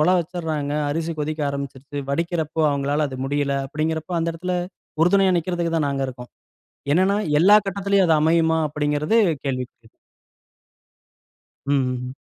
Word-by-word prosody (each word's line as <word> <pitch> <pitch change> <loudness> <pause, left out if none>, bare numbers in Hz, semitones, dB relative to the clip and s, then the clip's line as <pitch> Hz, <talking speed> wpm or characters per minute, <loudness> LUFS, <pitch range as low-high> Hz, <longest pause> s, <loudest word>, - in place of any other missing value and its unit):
ஒலை 175 +4 +4
வச்சிங்றாங்க, 160 -4 -3 0.2
அரிசி 165 +3 -2
கொதிக்க 155 +1 -3
ஆரம்பிச்சுருச்சு, 140 0 -6
வடிக்கிறப்போ 165 0 -1
அவங்களால 145 +2 0
அது 130 - -7
முடியல 140 0 0
அப்படிங்கிறப்ப 160 +3 -3
அந்த 165 0 0
இடத்துல 180 +2 -3 0.5
உறுதுணையா 190 +2 +4
நிக்கிறதுக்குதான் 165 -2 -1
நாங்க 140 -1 -1
இருக்கோம். 125 -1 -9 0.6
என்னன்னா 190 +4 +3 0.2
எல்லா 205 +5 +7
கட்டத்திலயும் 200 -1 +1
அது 160 - +5
அமையுமா? 160 +1 +3
அப்படிங்கிறது 150 +7 0 0.3
கேள்விக்குறி. 125 -3 -5 1.8
ம், 145 - +4
ம்ஹ்ம். 125 +1 -5
155 Hz, 120 wpm, -22 LUFS, 140-170 Hz, 1.8 s, எல்லா